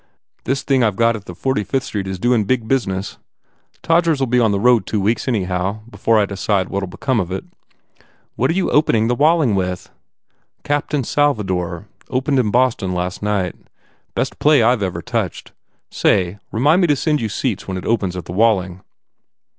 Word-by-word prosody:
This 135 Hz, +2 st, -1 dB
thing 135 Hz, -3 st, +2 dB
I 110 Hz, -, +4 dB
ve 100 Hz, -, -8 dB
got 115 Hz, +2 st, +2 dB
at 105 Hz, -2 st, -9 dB
the 90 Hz, -, -9 dB
Forty 130 Hz, +1 st, -1 dB
Fifth 135 Hz, +4 st, -1 dB
Street 100 Hz, -2 st, -4 dB
is 95 Hz, -1 st, -4 dB
doin 120 Hz, +1 st, +2 dB
big 115 Hz, 0 st, 0 dB
business. 100 Hz, -7 st, -2 dB, 0.6 s
Todgers 165 Hz, -3 st, +2 dB
ll 135 Hz, -, +2 dB
be 125 Hz, 0 st, +2 dB
on 115 Hz, -3 st, +3 dB
the 100 Hz, -, 0 dB
road 120 Hz, -2 st, +3 dB
two 105 Hz, -, -1 dB
weeks, 110 Hz, +7 st, 0 dB
anyhow, 95 Hz, -2 st, -1 dB
before 115 Hz, -1 st, +1 dB
I 105 Hz, -, +3 dB
decide 100 Hz, -1 st, -1 dB
what 100 Hz, -, -2 dB
ll 95 Hz, -, -4 dB
be 90 Hz, -, -12 dB
come 130 Hz, -4 st, 0 dB
of 90 Hz, -2 st, -3 dB
it 95 Hz, -, -3 dB, 0.5 s
" -, -, -35 dB
"What 130 Hz, -, +1 dB
are 165 Hz, -, 0 dB
you 190 Hz, -, 0 dB
opening 115 Hz, -7 st, +3 dB
the -, -, +2 dB
Walling 150 Hz, -2 st, +3 dB
with?" 90 Hz, -2 st, -2 dB
1 -, -, -35 dB, 0.7 s
Captain 145 Hz, -1 st, -1 dB
Salvador. 95 Hz, -, -1 dB, 0.2 s
.Opened 135 Hz, +1 st, +1 dB
in 115 Hz, -4 st, +1 dB
Boston 115 Hz, -6 st, +1 dB
last 90 Hz, +1 st, -3 dB
night. 100 Hz, -4 st, -1 dB, 0.6 s
Best -, -, -2 dB
play 150 Hz, -5 st, +4 dB
I 120 Hz, +3 st, +4 dB
ve 100 Hz, -5 st, -1 dB
ever 90 Hz, -, -6 dB
touched! 115 Hz, -7 st, -3 dB, 0.4 s
Say, 95 Hz, 0 st, +1 dB
re 110 Hz, -, -3 dB
mind 150 Hz, +8 st, +4 dB
me 175 Hz, -, +3 dB
to 145 Hz, -, +3 dB
send 150 Hz, +1 st, 0 dB
you 110 Hz, -, -2 dB
seats 110 Hz, 0 st, -3 dB
when 95 Hz, -1 st, -3 dB
it 90 Hz, -, -7 dB
opens 100 Hz, -6 st, 0 dB
the 85 Hz, -1 st, -6 dB
Walling." 95 Hz, -3 st, +1 dB
110 Hz, 205 wpm, -19 LUFS, 95-130 Hz, 0.7 s, I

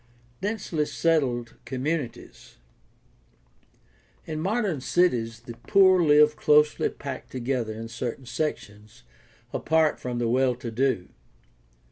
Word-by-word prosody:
Densely 195 Hz, -7 st, -2 dB
settled 130 Hz, -8 st, 0 dB
communities. 130 Hz, -2 st, -5 dB, 0.8 s
— -, -, -36 dB
In 155 Hz, -1 st, -4 dB
modern 195 Hz, -, -1 dB
cities 120 Hz, -9 st, +1 dB
the 120 Hz, 0 st, -9 dB
poor 185 Hz, -2 st, +6 dB
live 150 Hz, -1 st, +5 dB
closely 150 Hz, 0 st, +3 dB
packed 140 Hz, -2 st, -8 dB
together 125 Hz, -3 st, -2 dB
in 115 Hz, +1 st, -6 dB
certain 120 Hz, +2 st, -5 dB
sections, 105 Hz, -, -5 dB, 0.5 s
apart 160 Hz, -1 st, +1 dB
from 125 Hz, -1 st, -4 dB
the 120 Hz, -1 st, 0 dB
well 125 Hz, +1 st, +2 dB
to 120 Hz, -1 st, -7 dB
do. 120 Hz, -6 st, 0 dB
130 Hz, 110 wpm, -26 LUFS, 120-155 Hz, 0.8 s, poor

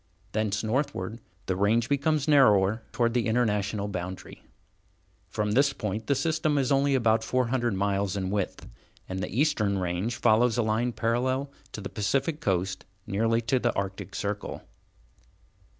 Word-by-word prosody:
Thence 105 Hz, 0 st, -1 dB
northward, 110 Hz, -3 st, -2 dB, 0.3 s
the 95 Hz, -, -1 dB
range 110 Hz, +4 st, +2 dB
becomes 145 Hz, +1 st, +1 dB
narrower 110 Hz, -7 st, +5 dB
toward 120 Hz, -2 st, +1 dB
the 120 Hz, -2 st, +1 dB
International 105 Hz, -3 st, 0 dB
boundary. 90 Hz, -1 st, -6 dB, 0.9 s
From 105 Hz, 0 st, -1 dB
this 140 Hz, +5 st, +3 dB
point 105 Hz, -1 st, -4 dB
the 140 Hz, -, +3 dB
system 155 Hz, 0 st, +1 dB
is 135 Hz, -1 st, +1 dB
only 140 Hz, 0 st, +3 dB
about 115 Hz, -3 st, +2 dB
four 125 Hz, -2 st, 0 dB
hundred 120 Hz, -4 st, 0 dB
miles 100 Hz, 0 st, 0 dB
in 95 Hz, -1 st, -2 dB
width, 100 Hz, -2 st, -3 dB, 0.4 s
and 95 Hz, 0 st, -4 dB
the 95 Hz, -, -3 dB
eastern 105 Hz, -10 st, +2 dB
range 90 Hz, +5 st, -2 dB
follows 115 Hz, +2 st, +3 dB
a 120 Hz, -, +2 dB
line 110 Hz, +3 st, 0 dB
parallel 125 Hz, +5 st, -1 dB, 0.2 s
to 110 Hz, -, -6 dB
the 95 Hz, -, -4 dB
Pacific 135 Hz, -, -1 dB
Coast, 95 Hz, -1 st, -1 dB, 0.2 s
nearly 115 Hz, +3 st, +1 dB
to 120 Hz, +3 st, +1 dB
the 120 Hz, -1 st, 0 dB
Arctic 100 Hz, 0 st, -4 dB
Circle. 105 Hz, 0 st, -4 dB
110 Hz, 150 wpm, -27 LUFS, 100-130 Hz, 0.9 s, narrower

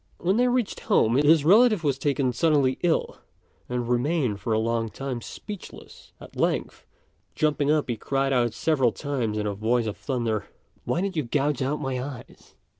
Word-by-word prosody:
When 190 Hz, +4 st, +1 dB
they 250 Hz, +1 st, +3 dB
reached 245 Hz, -3 st, 0 dB
home, 115 Hz, +3 st, +2 dB
his 150 Hz, +1 st, +4 dB
relative 215 Hz, +1 st, +5 dB
was 140 Hz, -3 st, 0 dB
taken 135 Hz, -2 st, 0 dB
suddenly 145 Hz, -3 st, +2 dB
ill 175 Hz, -2 st, 0 dB, 0.5 s
and 125 Hz, -1 st, -2 dB
remained 125 Hz, -3 st, 0 dB
for 110 Hz, +3 st, -4 dB
a 110 Hz, -, +3 dB
long 115 Hz, 0 st, 0 dB
time 130 Hz, 0 st, -5 dB
speechless; 205 Hz, -, -10 dB
at -, -, -13 dB
length, -, -, -2 dB, 0.5 s
jumping 150 Hz, -2 st, +1 dB
up 155 Hz, -1 st, +1 dB
he 120 Hz, -3 st, -2 dB
cried 135 Hz, +2 st, -1 dB
out 120 Hz, -3 st, +1 dB
several 135 Hz, -7 st, +2 dB
times 125 Hz, -6 st, -3 dB
in 105 Hz, -, -2 dB
a 105 Hz, -, -1 dB
voice 115 Hz, +4 st, 0 dB
of 105 Hz, -1 st, -3 dB
thunder, 115 Hz, -6 st, -2 dB, 0.4 s
"Why 175 Hz, -, 0 dB
did 195 Hz, -1 st, -2 dB
you 155 Hz, -, +1 dB
gouge 145 Hz, +2 st, -1 dB
out 140 Hz, +3 st, -1 dB
my 130 Hz, -1 st, -3 dB
eyes?" 130 Hz, -2 st, -10 dB
135 Hz, 180 wpm, -25 LUFS, 120-155 Hz, 0.5 s, relative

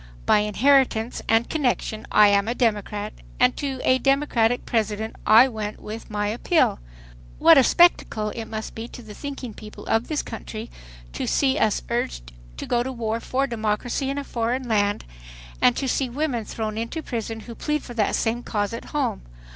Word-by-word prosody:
By -, -, +5 dB
inheritance 230 Hz, +2 st, +2 dB
and 225 Hz, +1 st, +3 dB
connection 245 Hz, -7 st, -1 dB
I 210 Hz, -1 st, +7 dB
am 200 Hz, +1 st, +2 dB
a 235 Hz, -, -1 dB
Democrat, 210 Hz, -2 st, -1 dB, 0.3 s
and 250 Hz, 0 st, +4 dB
to 275 Hz, -3 st, -3 dB
a 255 Hz, 0 st, +3 dB
Democratic 260 Hz, -4 st, +2 dB
President 220 Hz, -1 st, -1 dB
I 225 Hz, +4 st, +8 dB
went 215 Hz, -4 st, -5 dB
with 220 Hz, +2 st, -8 dB
my 205 Hz, -1 st, -1 dB
appeal.... 245 Hz, -, +2 dB, 0.6 s
What -, -, +7 dB
a -, -, +6 dB
spectacle 245 Hz, -10 st, +3 dB
it 225 Hz, 0 st, -6 dB
must 220 Hz, 0 st, -6 dB
be 225 Hz, +1 st, -6 dB
to 245 Hz, -, -11 dB
the 215 Hz, -1 st, -10 dB
thinking 270 Hz, -1 st, -6 dB
people 210 Hz, +1 st, -11 dB
of 225 Hz, +1 st, +1 dB
this 305 Hz, -2 st, -1 dB
country 225 Hz, 0 st, -7 dB, 0.4 s
to -, -, -3 dB
see -, -, +2 dB
us -, -, +1 dB
urged -, -, -2 dB, 0.3 s
to -, -, -5 dB
go 240 Hz, -1 st, +1 dB
to 260 Hz, +2 st, -3 dB
war 230 Hz, -2 st, -2 dB
for 265 Hz, +3 st, -1 dB
democracy 235 Hz, +2 st, -2 dB
in 275 Hz, -, -2 dB
a 285 Hz, -, -2 dB
foreign 245 Hz, 0 st, -2 dB
land, 205 Hz, -2 st, +1 dB, 0.6 s
and 125 Hz, -, +5 dB
to 270 Hz, -, -1 dB
see 260 Hz, 0 st, 0 dB
women 255 Hz, -4 st, -2 dB
thrown 215 Hz, 0 st, -4 dB
into 230 Hz, +8 st, -4 dB
prison 225 Hz, -3 st, -4 dB
who 235 Hz, -, -9 dB
plead 300 Hz, +5 st, -2 dB
for 240 Hz, -, -9 dB
that 220 Hz, -3 st, +1 dB
same 230 Hz, +1 st, 0 dB
cause 205 Hz, -2 st, -2 dB
at 230 Hz, -, -6 dB
home. 290 Hz, -, -2 dB
230 Hz, 185 wpm, -24 LUFS, 215-255 Hz, 0.6 s, I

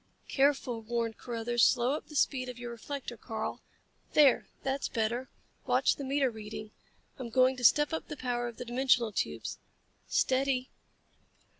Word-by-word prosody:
"Careful," 270 Hz, -4 st, +1 dB
warned 230 Hz, 0 st, -2 dB
Carruthers. 240 Hz, 0 st, 0 dB
"Slow 250 Hz, 0 st, +4 dB
up 300 Hz, -, -3 dB
the 300 Hz, -, -11 dB
speed 255 Hz, -2 st, +1 dB
of 250 Hz, -, -7 dB
your 240 Hz, -1 st, -6 dB
reflector, 245 Hz, +1 st, -6 dB
Karl. 220 Hz, 0 st, -4 dB, 0.5 s
There, 285 Hz, -4 st, +5 dB, 0.2 s
that's 270 Hz, +1 st, -1 dB
better. 235 Hz, +3 st, -1 dB, 0.4 s
Watch -, -, +3 dB
the 280 Hz, -, -6 dB
meter 270 Hz, -1 st, +1 dB
reading. 215 Hz, -1 st, -8 dB, 0.5 s
I'm 250 Hz, -2 st, -5 dB
going 255 Hz, +2 st, +4 dB
to 250 Hz, -, -7 dB
step 295 Hz, +5 st, +5 dB
up 320 Hz, -, -3 dB
the 300 Hz, -, -6 dB
power 245 Hz, -1 st, -1 dB
of 235 Hz, -, -8 dB
the 245 Hz, -, -6 dB
dimensional 245 Hz, -2 st, +2 dB
tubes. -, -, -3 dB, 0.5 s
Steady!" 260 Hz, -1 st, +1 dB
250 Hz, 155 wpm, -31 LUFS, 235-270 Hz, 0.5 s, There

